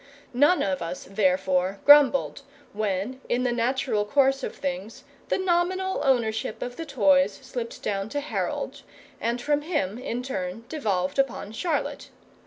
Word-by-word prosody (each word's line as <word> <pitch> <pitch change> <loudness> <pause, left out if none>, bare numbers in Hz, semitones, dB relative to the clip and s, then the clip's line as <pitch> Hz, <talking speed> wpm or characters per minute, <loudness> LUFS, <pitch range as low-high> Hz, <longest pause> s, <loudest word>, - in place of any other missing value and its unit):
None 290 +8 +4
of 190 -1 -1
us, 170 +2 -5
therefore, 190 -1 +1
grumbled 285 -1 +6 0.3
when 210 +5 -2
in 245 +1 +1
the 250 - +1
natural 240 -2 0
course 270 +5 +2
of - - -5
things 185 +4 -5 0.3
the - - +2
nominal 375 +1 0
ownership 225 -5 0
of 245 0 -6
the 330 +2 -6
toys 195 -6 +3
slipped 245 -2 -6
down 195 0 -2
to 290 - -2
Harold, 290 +1 -3 0.4
and 235 +1 -1
from 290 +4 +1
him 245 - -2
in 250 -1 -4
turn 195 -3 -4
devolved 200 - -1
upon 260 -6 0
Charlotte. 305 +7 -2
240 Hz, 145 wpm, -26 LUFS, 195-280 Hz, 0.4 s, grumbled